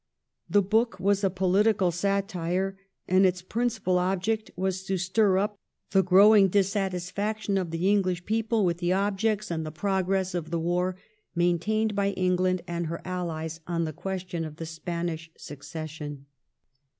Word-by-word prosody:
The 205 -1 +4
book 220 0 +1
was 200 +2 +2
a 195 - +4
political 190 +1 +2
satire, 190 0 -1 0.3
and 185 +1 +4
its 180 -1 +2
principal 220 -4 0
object 195 +4 -1
was 190 0 -2
to 190 0 -1
stir 190 +2 +2
up 205 +1 -1 0.3
the 195 0 +5
growing 195 +2 +7
dissatisfaction 200 +2 -1
of 185 -3 0
the 165 +3 -1
English 185 -3 +1
people 225 -1 +1
with 170 -1 0
the 175 0 +1
objects 205 +1 0
and 160 -1 -2
the 155 - -5
progress 190 +2 0
of 170 -3 -3
the 170 - -1
war 175 +2 0 0.4
maintained 175 +6 +1
by 200 0 0
England 185 -1 +1
and 170 -1 -2
her 170 +1 -4
allies 165 -3 -4
on 170 -1 0
the 155 - -4
question 180 -1 -4
of 155 -2 -6
the 165 - -6
Spanish 165 0 -4
Succession. 150 -1 -7
185 Hz, 150 wpm, -27 LUFS, 175-200 Hz, 0.4 s, growing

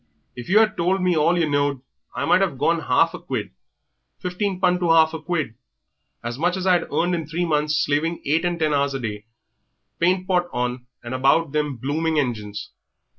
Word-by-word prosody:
If 120 -1 -8
you 195 - +4
had 215 -1 +4
told 180 +3 +1
me 180 -1 +2
all 165 +3 +3
yer 165 -2 +2
knowed 145 -2 0 0.4
I - - -1
might - - +4
'ave - - 0
gone - - +1
'alf - - +2
a - - -6
quid - - -4 0.7
fifteen 185 +1 -3
pun 180 -1 +2
to 175 -2 0
'alf 160 -1 +5
a 160 - -5
quid! 155 -10 -2 0.7
as 120 +2 -5
much 175 +3 +1
as 185 - -4
I'd 180 -2 +2
earn 175 +1 +1
in 165 -4 -2
three 170 +3 -1
months 150 -2 +1
slaving 155 +4 0
eight 155 +4 +1
and 175 -1 0
ten 155 -2 +1
hours 140 -1 +1
a - - -2
day, 105 -3 -5 0.7
paint 185 +2 +1
pot 180 -2 +1
on 125 0 -3 0.2
'and 120 +1 -6
about 135 +4 +2
them 150 -2 -1
blooming 155 +6 -1
engines. 105 -7 -3
160 Hz, 200 wpm, -22 LUFS, 140-175 Hz, 0.7 s, alf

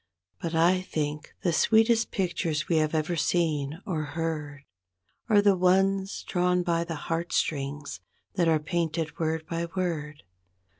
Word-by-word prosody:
But 165 -1 -3
I 175 +3 +4
think 150 -4 -4
the 175 - +2
sweetest 225 +6 +4
pictures 170 -4 -1
we 165 - +2
have 155 0 +1
ever 155 +2 0
seen 155 -1 0
or 170 -7 -2
heard 150 -2 -4 0.7
Are 205 -2 +5
the 200 -2 +5
ones 190 +2 +2
drawn 180 0 +1
by 170 -1 +1
the 170 -1 -5
heartstrings 145 - -2 0.3
that 175 -3 +1
are 160 -1 +4
painted 160 0 -2
word 160 -1 -1
by 170 +1 -3
word. 155 -5 -3
165 Hz, 140 wpm, -27 LUFS, 155-180 Hz, 0.7 s, Are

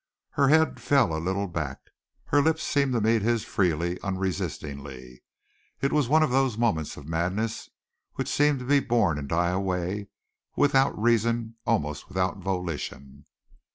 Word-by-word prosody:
Her 140 -1 +2
head 160 +2 +3
fell 130 - +3
a 80 - -3
little 95 +4 -1
back, 75 -6 -4 0.5
her 145 - +3
lips 160 +2 +1
seemed 140 -2 +1
to 115 - +1
meet 110 +1 +3
his 115 +1 0
freely, 85 -2 0
unresistingly. 75 -9 -5 0.6
It 140 - 0
was 150 -5 +2
one 155 +2 +5
of 155 - 0
those 130 -3 +2
moments 105 -11 0
of 75 - -10
madness 90 +7 -2 0.5
which - - -3
seem 145 -1 +2
to 125 - -7
be 140 +2 +4
born 110 - +1
and 70 -1 -7
die 85 +1 +1
away, 95 +1 -2 0.5
without 135 -4 +3
reason, 115 0 +1
almost 75 - -1
without 95 0 -1
volition. 85 -7 -5
100 Hz, 155 wpm, -26 LUFS, 85-125 Hz, 0.6 s, one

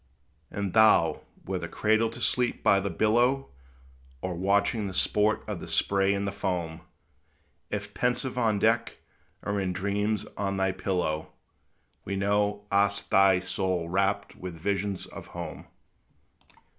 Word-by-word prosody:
And 100 -3 -3
thou, 110 -7 +5 0.2
whether - - -3
cradled 110 +1 +1
to 120 - -9
sleep 125 0 0
by 100 - +5
the 100 +1 -2
billow, 120 +9 +2 0.7
Or 95 +6 -3
watching 100 +4 +1
the 95 - -6
sport 105 +3 +2
of - - -4
the - - -8
spray 100 0 +2
and 100 0 -2
the - - -1
foam, 90 -5 -3 0.9
If - - -4
pensive 125 +1 -1
on 115 -4 +2
deck, 115 +3 +1 0.5
or 100 0 -1
in 95 -2 -1
dreams 100 +3 -1
on 100 -1 -2
thy 95 0 +2
pillow, 90 -5 -2 0.7
We 100 - -3
know 105 +1 0
hast 100 +1 +1
thy 95 -1 +5
soul 95 -2 -1
rapt 100 +2 0
with 90 -2 -7
visions 95 +3 -2
of - - -10
home. 80 -5 -7
100 Hz, 140 wpm, -28 LUFS, 95-105 Hz, 0.9 s, thou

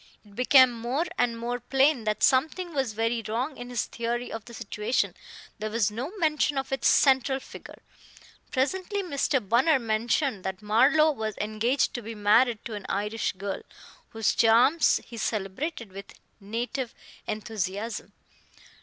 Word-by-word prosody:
It 205 -1 -18
became 255 +1 +6
more 240 +7 -2
and 240 -2 +1
more 240 +1 -3
plain 270 0 +2
that 215 0 -1
something 320 +6 +2
was 265 -6 -1
very 230 +2 0
wrong 250 +7 -2
in 245 0 -8
his 245 -2 -1
theory 240 +1 -3
of 225 -1 -6
the 235 - -12
situation; 215 +2 -1 0.5
there 215 +1 -3
was 215 -2 +1
no 250 +9 -4
mention 305 -4 +1
of 270 0 -3
its 270 -2 +1
central 265 -1 +4
figure. - - -12 0.7
Presently 375 +9 -1
Mr. 280 - 0
Bunner 260 - +4
mentioned 230 0 0
that 190 +2 -5
Marlowe 270 +9 +4
was 220 -6 -4
engaged 215 +6 0
to 240 - -4
be 225 +1 -7
married 215 +2 +3
to 230 - -5
an 205 -2 -7
Irish 210 +3 -1
girl, 195 +1 -5 0.5
whose 225 -2 0
charms 240 +8 +4
he 235 - -10
celebrated 220 - -3
with 195 +1 -10 0.3
native 235 +5 -4 0.3
enthusiasm. 215 0 -4
235 Hz, 150 wpm, -27 LUFS, 215-270 Hz, 0.7 s, became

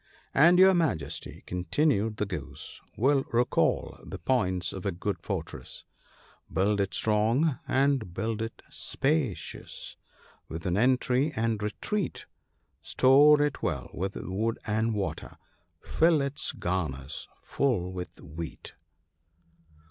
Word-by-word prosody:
And 170 +5 +6
your 190 +1 +7
Majesty," 160 - -2
continued 105 - 0
the 105 - 0
Goose, 75 -8 -7
" - - -35
will 135 +3 +3
recall 120 +1 +1
the - - -7
points 95 -8 0
of 95 - -6
a 100 - 0
good 95 +3 -3
fortress, - - -5 0.2
— - - -28
" - - -32
Build 100 +1 +2
it 100 -1 -1
strong, 115 +7 +2
and 135 -7 +2
build 110 +4 -2
it 115 0 -6
spacious, 135 - -2 0.5
with 80 +1 -6
an 90 -1 +1
entry 130 +5 +2
and 110 -1 0
retreat; 180 - -3 0.6
Store 145 +3 +6
it 145 -1 -2
well 70 -4 -2
with 95 +3 -3
wood 110 +6 -2
and 110 +1 0
water, 100 -2 -4 0.5
fill 165 -1 +3
its 140 +1 -1
garners 80 -6 -3 0.2
full 110 -10 0
with 90 -1 -7
wheat." 80 +3 -8
110 Hz, 125 wpm, -28 LUFS, 95-135 Hz, 0.6 s, your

